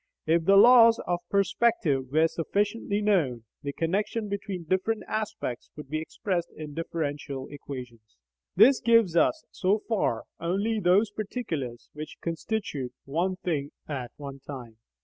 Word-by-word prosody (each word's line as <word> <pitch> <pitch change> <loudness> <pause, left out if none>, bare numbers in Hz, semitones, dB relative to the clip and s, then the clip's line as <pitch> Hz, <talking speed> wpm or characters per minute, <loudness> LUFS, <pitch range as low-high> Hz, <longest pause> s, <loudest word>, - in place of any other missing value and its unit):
If 165 +1 +2
the 195 +2 +6
laws 230 +1 +8
of 175 0 0
perspective 195 - +1
were 160 +2 +4
sufficiently 205 +5 -1
known, 155 - +1 0.2
the 140 -1 -3
connection 205 +7 -1
between 200 -3 -4
different 190 +6 0
aspects 210 - -3
would 150 -2 -9
be 155 0 -1
expressed 175 +2 -2
in 150 -2 -7
differential 145 -4 -4
equations. 125 - -9 0.4
This 245 +8 +7
gives 230 -7 +4
us, 310 - +3
so 205 +3 +1
far, 190 - 0 0.2
only 200 +6 0
those 200 +3 +3
particulars 170 - -4
which 155 +1 -8
constitute 165 - -3
one 175 +7 0
thing 150 -6 -3
at 130 -5 -4
one 140 -1 -8
time. 125 -5 -9
170 Hz, 135 wpm, -27 LUFS, 140-205 Hz, 0.4 s, laws